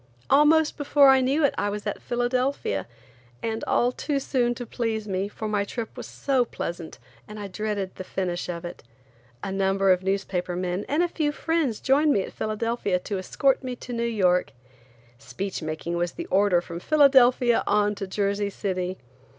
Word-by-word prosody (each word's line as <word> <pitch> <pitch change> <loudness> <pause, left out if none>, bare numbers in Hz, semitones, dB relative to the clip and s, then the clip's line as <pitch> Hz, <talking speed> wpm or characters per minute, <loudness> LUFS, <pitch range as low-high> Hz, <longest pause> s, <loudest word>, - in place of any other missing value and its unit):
Almost 300 +2 +5
before 285 -1 +5
I 265 0 +6
knew 280 +4 +2
it - - +2
I 205 - 0
was 205 0 -5
at - - -3
Philadelphia, 245 - -1 0.6
and 225 0 -2
all 245 +1 +2
too 280 +2 -2
soon 245 -3 0
to 245 - -6
please 225 -2 -3
me, 190 0 -1
for 215 +1 -6
my 205 -1 0
trip 225 +2 -6
was - - -7
so 270 -3 +1
pleasant 170 -7 -6 0.3
I 210 -1 -7
dreaded 200 -1 -3
the - - -7
finish 180 -1 -3
of 170 0 -5
it. 175 - -8 0.6
A 195 - -3
number 195 0 +2
of 180 0 +3
newspaper 190 -2 -2
men 180 +2 -2
and 300 +5 +2
a - - +2
few 310 -3 -1
friends 305 -7 -1
joined 290 +2 +3
me 195 - +1
at - - -9
Philadelphia 215 -3 -1
to 190 +2 -4
escort 270 +9 +1
me 255 -1 -4
to 245 0 -8
New 235 - -2
York. 190 -6 +1 0.7
Speech 185 +13 -5
making 160 +2 -4
was 175 0 -1
the - - -6
order 190 -2 +4
from 170 -1 -7
Philadelphia 255 - +5
on 210 0 +2
to 195 -1 -6
Jersey 200 +1 -1
City. 185 -2 -3
210 Hz, 180 wpm, -25 LUFS, 185-255 Hz, 0.7 s, I